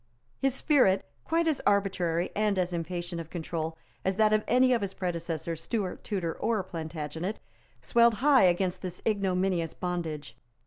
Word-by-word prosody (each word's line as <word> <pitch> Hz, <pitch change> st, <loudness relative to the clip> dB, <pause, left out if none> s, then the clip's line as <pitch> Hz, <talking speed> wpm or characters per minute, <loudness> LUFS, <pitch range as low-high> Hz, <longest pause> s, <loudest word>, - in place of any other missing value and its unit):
His 270 Hz, -1 st, +1 dB
spirit, 255 Hz, -11 st, +3 dB, 0.2 s
quite 335 Hz, 0 st, +1 dB
as 310 Hz, -4 st, +1 dB
arbitrary 185 Hz, -4 st, +1 dB
and 210 Hz, -1 st, +1 dB
as 180 Hz, -1 st, 0 dB
impatient 175 Hz, 0 st, -3 dB
of 165 Hz, -, -10 dB
control 160 Hz, -1 st, -4 dB, 0.3 s
as 190 Hz, 0 st, 0 dB
that 215 Hz, +1 st, +4 dB
of 215 Hz, 0 st, +3 dB
any 255 Hz, +1 st, +4 dB
of 235 Hz, -, +1 dB
his 195 Hz, -1 st, -3 dB
predecessors, 170 Hz, -2 st, -3 dB
Stuart, 205 Hz, -6 st, -3 dB
Tudor 180 Hz, -6 st, -2 dB
or 220 Hz, -4 st, 0 dB
Plantagenet, 160 Hz, +2 st, -4 dB, 0.5 s
swelled 235 Hz, -1 st, +4 dB
high 270 Hz, 0 st, +5 dB
against 180 Hz, 0 st, +1 dB
this 180 Hz, -2 st, -6 dB
ignominious 185 Hz, -5 st, 0 dB
bondage. 170 Hz, -5 st, -4 dB
185 Hz, 150 wpm, -29 LUFS, 170-215 Hz, 0.5 s, high